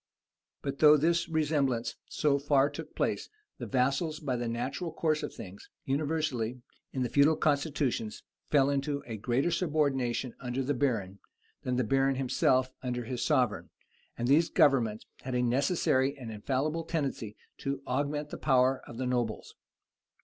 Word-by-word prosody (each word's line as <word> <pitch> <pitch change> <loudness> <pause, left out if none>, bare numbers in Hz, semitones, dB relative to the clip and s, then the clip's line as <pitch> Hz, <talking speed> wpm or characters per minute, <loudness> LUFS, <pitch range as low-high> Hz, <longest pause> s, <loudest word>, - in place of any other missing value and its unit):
] - - -61
But 140 0 -4
though 150 0 +8
this 170 +3 +1
resemblance 145 -7 0
so 145 -2 +1
far 140 0 +3
took 145 - -8
place, - - -1 0.3
the - - -5
vassals 140 +5 0
by 140 -5 -2
the 120 -1 -2
natural 135 +9 -3
course 155 -1 0
of - - -4
things, 95 0 -10 0.2
universally, 135 -5 -1 0.3
in 130 - -1
the - - 0
feudal 145 +3 +4
constitutions, 140 -7 0 0.3
fell 140 -1 +4
into 140 +1 -1
a 115 -2 -5
greater 125 +9 0
subordination 140 -8 0
under 125 +1 -2
the 140 +3 0
baron, 115 -8 -1 0.4
than 125 - -1
the 125 - +2
baron 135 +4 +2
himself 130 0 +2
under 125 -1 -3
his 120 +1 -3
sovereign; 125 -5 +1 0.5
and 120 - -1
these 155 +5 +4
governments 125 - +3 0.2
had 130 -1 -4
a 125 - +2
necessary 135 +1 +2
and 120 -4 -7
infallible 135 +9 -1
tendency 140 -10 -3 0.2
to 140 0 -3
augment 145 +3 -2
the - - -6
power 130 -2 +3
of 120 - -9
the 130 - -2
nobles. 120 -3 -2
135 Hz, 155 wpm, -30 LUFS, 125-150 Hz, 0.5 s, though